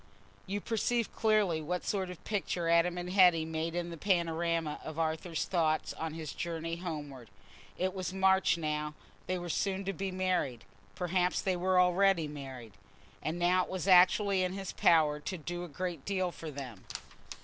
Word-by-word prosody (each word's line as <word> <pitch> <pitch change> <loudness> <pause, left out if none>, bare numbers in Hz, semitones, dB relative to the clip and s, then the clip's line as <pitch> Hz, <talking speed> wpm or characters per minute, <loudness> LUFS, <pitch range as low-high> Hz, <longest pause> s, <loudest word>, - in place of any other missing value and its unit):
You 200 +2 -2
perceive 230 +1 0
clearly 210 -7 +2
what 180 +4 -3
sort 190 -3 -1
of 180 - -9
picture 185 -5 -2
Adam 170 +1 +3
and 180 0 -4
Hetty 180 -4 +5
made 160 +1 -3
in 175 -1 -2
the 170 - -7
panorama 170 -3 0
of 160 0 -7
Arthur's 160 +1 -1
thoughts 160 -4 0
on 160 -1 -5
his 155 -3 -6
journey 165 0 -3
homeward. 145 - -6 0.5
It 185 0 0
was 185 -2 -3
March 190 -2 +3
now; 150 -1 -2 0.3
they 185 - 0
were 175 0 -5
soon 195 +3 -1
to 195 - -1
be 195 +2 -3
married: 185 - -1 0.3
perhaps 180 0 +1
they 190 -1 0
were 185 +1 +2
already 180 -2 +4
married. 130 -6 -8 0.5
And 160 +2 -2
now 180 +1 +3
it - - -9
was 185 -1 -3
actually 190 +1 +5
in 185 0 -1
his 195 -1 -5
power 155 -3 +4
to 185 +5 -5
do 175 +2 -5
a - - -6
great 170 -1 -4
deal 185 -2 -1
for 165 -2 -8
them. 130 -8 -8
175 Hz, 175 wpm, -32 LUFS, 160-185 Hz, 0.5 s, Hetty